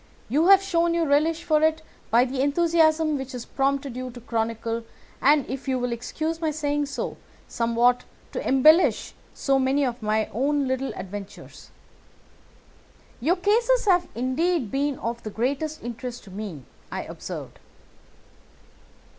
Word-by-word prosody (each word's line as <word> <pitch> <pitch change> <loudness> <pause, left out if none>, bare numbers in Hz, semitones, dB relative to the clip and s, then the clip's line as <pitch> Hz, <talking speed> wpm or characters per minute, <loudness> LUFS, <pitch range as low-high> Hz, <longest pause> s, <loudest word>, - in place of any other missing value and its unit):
You 305 +8 +3
have 390 0 +7
shown 340 -3 +1
your 335 -1 +1
relish 315 +3 +2
for 305 -1 +2
it 315 0 +2 0.3
by 235 +3 +5
the 260 +1 -2
enthusiasm 315 0 +3
which 265 -1 -6
has 245 -2 -6
prompted 275 -1 -1
you 255 0 -4
to 245 0 -10
chronicle, 230 0 -2 0.4
and, 285 -1 +4
if 265 +2 -6
you 260 -1 +1
will 245 -1 -2
excuse 315 +7 -3
my 320 - +1
saying 290 -1 -1
so, 280 - -4 0.3
somewhat 235 +1 +2 0.3
to - - -3
embellish 310 +6 +4 0.2
so 270 -1 +1
many 270 +2 +2
of 245 -1 -3
my 215 0 +1
own 280 +4 +1
little 260 +1 -1
adventures." 195 +1 -9 1.5
"Your 315 +9 +2
cases 455 +6 +2
have 360 -3 +3
indeed 260 - 0
been 280 0 0
of 235 +1 -4
the 215 - -6
greatest 280 +8 -2
interest 240 +1 -6
to 195 - -13
me," 190 -8 -6 0.3
I - - -3
observed. - - -8
270 Hz, 145 wpm, -25 LUFS, 240-315 Hz, 1.5 s, have